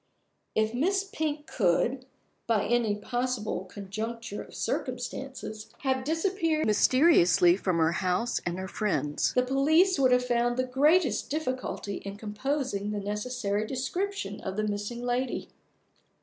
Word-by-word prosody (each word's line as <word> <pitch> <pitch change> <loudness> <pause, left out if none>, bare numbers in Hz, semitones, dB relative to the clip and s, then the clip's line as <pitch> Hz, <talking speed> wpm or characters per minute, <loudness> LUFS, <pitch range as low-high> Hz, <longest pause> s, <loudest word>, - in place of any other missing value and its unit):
If 220 +1 +1
Miss 380 +10 +1
Pink 305 -6 -3
could, 250 - +1 0.4
by 225 -3 +2
any 235 -2 +2
possible 240 -3 -2
conjuncture 215 +2 -5
of - - -12
circumstances, 250 -3 -4
have 260 -2 0
disappeared 325 +1 0
mysteriously 210 - +5
from 185 -3 -1
her 160 0 +3
house 185 +6 0
and 175 0 -2
her 190 0 -4
friends, 155 -9 0
the 250 - +4
police 305 +7 +3
would 260 -2 +4
have 250 0 +4
found 240 0 +1
the 255 - +2
greatest 290 +6 +2
difficulty 255 -8 -3
in 195 0 -7
composing 215 0 -2
the 210 -1 -2
necessary 210 0 -2
description 265 - -3
of 190 - -4
the 215 - +1
missing 210 +3 -3
lady. 245 +1 -1
240 Hz, 135 wpm, -28 LUFS, 205-270 Hz, 0.4 s, mysteriously